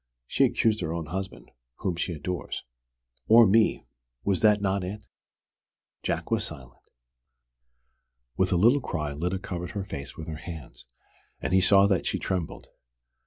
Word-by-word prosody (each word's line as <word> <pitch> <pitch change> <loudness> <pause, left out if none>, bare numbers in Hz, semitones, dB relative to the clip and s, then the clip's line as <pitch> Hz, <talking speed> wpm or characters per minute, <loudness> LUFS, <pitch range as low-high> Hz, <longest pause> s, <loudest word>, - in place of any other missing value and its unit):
"She's - - +3
accused 110 -2 +1
her 80 -2 -2
own 85 -2 -3
husband 95 +5 -6 0.2
whom 90 -3 -2
she 85 - -2
adores." 85 +3 -4 0.6
"Or 115 +1 +8
me! 110 +3 +3 0.4
Was 100 -2 +1
that 105 -1 +5
not 100 -1 0
it?" 100 +3 -6 1.0
Jack - - -2
was - - +2
silent. 60 -3 -9 1.5
With 95 0 +1
a - - +3
little 120 +10 +5
cry 75 -10 -3
Lyda 90 +6 -2
covered 90 -1 -5
her 100 - -1
face 70 -6 -7
with 80 - -7
her 80 -1 -5
hands, 80 -7 -9 0.5
and - - -2
he 95 - +5
saw 100 +2 +6
that 100 -3 +1
she - - 0
trembled. 90 -4 -3
95 Hz, 155 wpm, -27 LUFS, 80-100 Hz, 1.5 s, Or